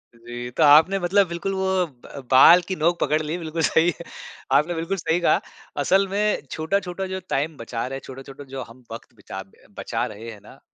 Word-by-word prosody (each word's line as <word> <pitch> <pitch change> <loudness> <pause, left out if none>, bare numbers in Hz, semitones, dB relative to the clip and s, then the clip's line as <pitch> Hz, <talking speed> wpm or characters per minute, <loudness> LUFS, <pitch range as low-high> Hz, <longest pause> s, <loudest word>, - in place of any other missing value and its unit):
जी। 120 +1 -8
तो 160 - +1
आपने 155 +6 +6
मतलब 190 +2 +2
बिल्कुल 170 +3 -4
वो 190 -1 0
ब 130 -6 -22
अ, - - -9
बाल 165 +7 +8
की 190 - -2
नोंक 170 +1 +1
पकड़ 155 +2 +1
ली 155 +2 -3
बिल्कुल 165 -1 -4
सही। 165 +2 +3 0.6
आपने 150 +6 +3
बिल्कुल 165 +4 -3
सही 165 0 0
कहा। 175 - +3 0.4
असल 195 +1 +3
में 210 +2 0
छोटा-छोटा 180 +3 -2
जो 190 0 -4
टाइम 150 +3 -1
बचा 115 0 -5
रहे 135 - -5
है, - - -7
छोटा-छोटा 135 +1 -10
जो 135 - -4
हम 125 +2 -18
वक़्त 115 +2 -10
बचा 95 - -8
ब 95 - -29 0.3
बचा - - -2
रहे 110 +2 -8
हैं 105 - -12
ना, - - -16
160 Hz, 205 wpm, -23 LUFS, 135-180 Hz, 0.6 s, बाल